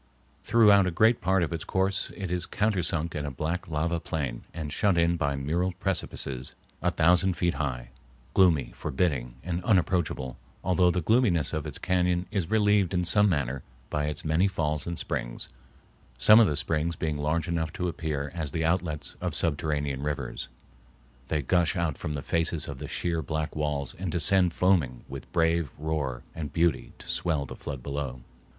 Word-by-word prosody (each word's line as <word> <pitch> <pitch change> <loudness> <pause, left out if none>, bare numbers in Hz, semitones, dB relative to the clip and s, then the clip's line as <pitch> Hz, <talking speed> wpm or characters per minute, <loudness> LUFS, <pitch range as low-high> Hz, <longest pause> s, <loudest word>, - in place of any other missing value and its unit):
Throughout 105 -4 +6
a 85 -2 -4
great 115 +2 +4
part 95 -1 +2
of 85 - -2
its 80 - -3
course 95 +1 0
it 95 -4 -4
is 90 -2 -1
countersunk 90 -6 0
in 75 - -3
a 75 - -2
black 80 +7 -3
lava 85 +2 -1
plain 70 -8 -3
and 75 -2 -5
shut 100 -4 +2
in 85 +1 +3
by 70 -4 0
mural 85 +7 -1
precipices 70 -9 -3 0.3
a - - +2
thousand 90 +3 +3
feet 85 -1 +1
high, 60 -5 -3 0.4
gloomy, 85 -9 +4
forbidding, 65 -5 -1
and 90 0 -3
unapproachable, 90 - +1 0.3
although 90 -1 +3
the 90 0 0
gloominess 105 - +2
of 80 -1 -2
its 75 - -6
cañon 90 -1 +1
is 95 -6 -1
relieved 105 -4 +3
in 90 0 +1
some 105 +4 +4
manner 70 -6 -1 0.3
by 75 -1 0
its 75 +1 -3
many 80 +5 +3
falls 75 -5 -1
and 85 -1 -3
springs, - - -4 0.7
some 110 +1 +8
of 115 - +6
the 75 - -1
springs 80 +1 0
being 75 -2 -2
large 80 +4 0
enough 80 -2 -1
to 90 - -2
appear 75 -3 -3
as 80 -4 -3
the 80 +3 -1
outlets 80 -3 -1
of - - -2
subterranean 75 -4 -1
rivers. 75 0 -3 0.8
They 75 -1 -1
gush 85 +4 +2
out 85 -5 0
from 75 - -4
the 70 -1 -4
faces 85 -1 0
of 70 -2 -6
the 75 - -5
sheer 85 +1 -1
black 75 +1 -3
walls 75 -3 -2
and 95 -2 -2
descend 90 +2 +4
foaming 85 -9 +1
with 65 0 -9
brave 80 -2 +2
roar 70 -5 -2
and 75 -3 -5
beauty 85 0 +1
to - - -13
swell 80 -5 0
the - - -8
flood 65 -2 -6
below. 70 -3 -4
80 Hz, 180 wpm, -28 LUFS, 75-90 Hz, 0.8 s, some